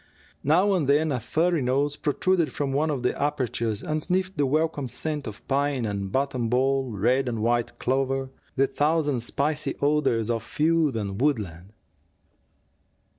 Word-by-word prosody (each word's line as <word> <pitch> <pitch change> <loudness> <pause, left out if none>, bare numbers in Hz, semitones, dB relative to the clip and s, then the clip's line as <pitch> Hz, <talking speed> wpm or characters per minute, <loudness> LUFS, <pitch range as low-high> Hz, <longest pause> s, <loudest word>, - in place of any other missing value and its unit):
Now 180 +8 +3
and 170 -7 +1
then 150 +2 +3
a 130 - 0
furry 165 +6 +1
nose 140 +3 +1
protruded 165 +3 +1
from 140 -2 -2
one 150 +3 +1
of 135 -5 -2
the 125 - +1
apertures 120 -7 -1
and 155 0 -1
sniffed 185 +3 -1
the 145 -3 +1
welcome 155 -1 0
scent 150 +2 -3
of 105 - -9
pine 140 -2 0
and 100 -2 -3
buttonball, 130 0 +1
red 130 +4 +2
and 115 -3 -3
white 120 0 0
clover, 135 +1 -1 0.2
the 135 0 +4
thousand 145 -2 +1
spicy 145 +3 -1
odors 140 -6 +1
of 115 -1 -1
field 155 +2 +1
and 100 0 -3
woodland. 100 - -1
135 Hz, 150 wpm, -25 LUFS, 120-150 Hz, 0.2 s, the